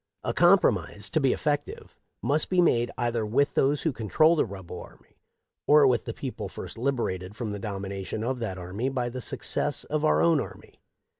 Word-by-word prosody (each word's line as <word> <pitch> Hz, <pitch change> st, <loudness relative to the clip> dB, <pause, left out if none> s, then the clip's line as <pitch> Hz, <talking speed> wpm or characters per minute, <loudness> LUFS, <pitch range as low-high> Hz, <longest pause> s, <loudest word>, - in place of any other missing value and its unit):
A 115 Hz, -, -1 dB
compromise, 125 Hz, -, +3 dB
to 160 Hz, -, +2 dB
be 135 Hz, -3 st, +3 dB
effective, 145 Hz, -2 st, -3 dB, 0.2 s
must 150 Hz, +2 st, +2 dB
be 185 Hz, -, +2 dB
made 120 Hz, -9 st, +3 dB
either 120 Hz, -2 st, 0 dB
with 135 Hz, +7 st, +1 dB
those 140 Hz, +2 st, +2 dB
who 160 Hz, -, +1 dB
control 155 Hz, -, +3 dB
the 155 Hz, -, +2 dB
rebel 95 Hz, -3 st, -8 dB
army, -, -, -17 dB, 0.5 s
or 150 Hz, -1 st, +7 dB
with 125 Hz, -4 st, +2 dB
the -, -, -3 dB
people -, -, -5 dB
first -, -, -8 dB
liberated 115 Hz, -7 st, -2 dB
from 115 Hz, -2 st, -4 dB
the 100 Hz, -, -5 dB
domination 100 Hz, 0 st, -5 dB
of 125 Hz, +2 st, -2 dB
that 110 Hz, -5 st, -4 dB
army 95 Hz, +8 st, -3 dB
by 125 Hz, -2 st, -2 dB
the 130 Hz, +1 st, -6 dB
success -, -, -2 dB
of -, -, -2 dB
our 75 Hz, 0 st, +3 dB
own 85 Hz, +1 st, +4 dB
army. -, -, -11 dB
120 Hz, 190 wpm, -27 LUFS, 100-140 Hz, 0.5 s, or